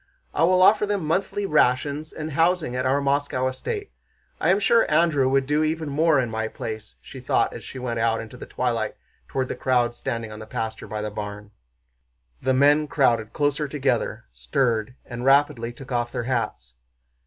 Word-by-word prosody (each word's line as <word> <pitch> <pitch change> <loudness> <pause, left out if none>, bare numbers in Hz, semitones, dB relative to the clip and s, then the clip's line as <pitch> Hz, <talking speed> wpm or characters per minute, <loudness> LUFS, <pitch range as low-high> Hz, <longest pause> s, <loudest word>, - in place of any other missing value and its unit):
"I - - -1
will 185 +1 +4
offer 210 +2 +5
them 200 -5 -1
monthly 190 +5 -1
rations 150 0 +1
and 155 0 -6
housing 165 -3 +1
at 125 0 0
our 140 +2 +2
Moscow 140 -2 0
estate. 410 - -4 0.5
I - - +1
am 190 +2 +4
sure 230 +2 +3
Andrew 150 -4 +3
would 135 0 +2
do 150 +3 +1
even 155 0 -1
more 155 +1 +3
in 120 -3 -1
my 110 0 -2
place," 110 - -7
she - - -10
thought - - +1
as - - -8
she - - -9
went 120 -2 -3
out 115 0 +1
in 115 - -6
the 125 +3 -10
twilight 115 -3 -1 0.3
toward 130 -1 -2
the - - -4
crowd 120 -2 +1
standing 115 -2 -4
on 105 - -8
the 110 - -9
pasture 110 0 -4
by 105 0 -4
the 105 - -3
barn. 105 0 -7 0.9
The 130 - +1
men 145 +3 +4
crowded 120 -7 +2
closer 145 0 0
together, 140 - -1
stirred, 115 - -1
and 120 0 -6
rapidly 135 -3 +3
took 135 +2 -12
off 120 -1 -1
their - - -3
hats. 110 - -3
130 Hz, 190 wpm, -24 LUFS, 115-150 Hz, 0.9 s, offer